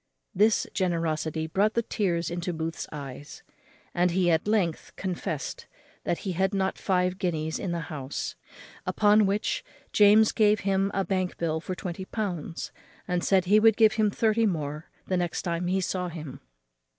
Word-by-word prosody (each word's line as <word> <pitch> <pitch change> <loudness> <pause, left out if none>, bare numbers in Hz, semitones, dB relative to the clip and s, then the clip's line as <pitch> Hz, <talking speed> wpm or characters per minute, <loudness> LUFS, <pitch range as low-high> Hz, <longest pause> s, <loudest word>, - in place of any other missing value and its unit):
This 210 +3 +3
generosity 160 -4 -1
brought 200 +7 +1
the 235 - +2
tears 175 -6 -1
into 175 +1 -2
Booth's 160 0 -4
eyes; 140 -1 -8 0.5
and 175 +1 +3
he 175 0 +2
at 160 +4 +1
length 195 -7 0
confest 170 -6 -4 0.4
that 170 - 0
he 190 - -1
had 190 +3 0
not 190 0 0
five 180 -1 +1
guineas 160 -4 -1
in 190 - -3
the 170 -1 -2
house; 145 -4 -5 0.5
upon 210 0 +4
which 210 - -1 0.3
James 210 +1 +6
gave 210 -1 +3
him 195 0 +1
a 195 -1 +1
bank 185 0 -1
bill 160 -1 -1
for 185 - -4
twenty 180 +1 -5
pounds, 180 -7 -4 0.4
and 180 -1 0
said 190 -2 +3
he 205 +4 +5
would 220 -1 +5
give 220 -1 +6
him 215 -1 +2
thirty 220 +2 +2
more 155 -3 -3 0.2
the 185 - 0
next 175 -1 -2
time 175 -1 -1
he 190 +2 +1
saw 180 0 -2
him. 155 -5 -8
180 Hz, 165 wpm, -27 LUFS, 165-205 Hz, 0.5 s, James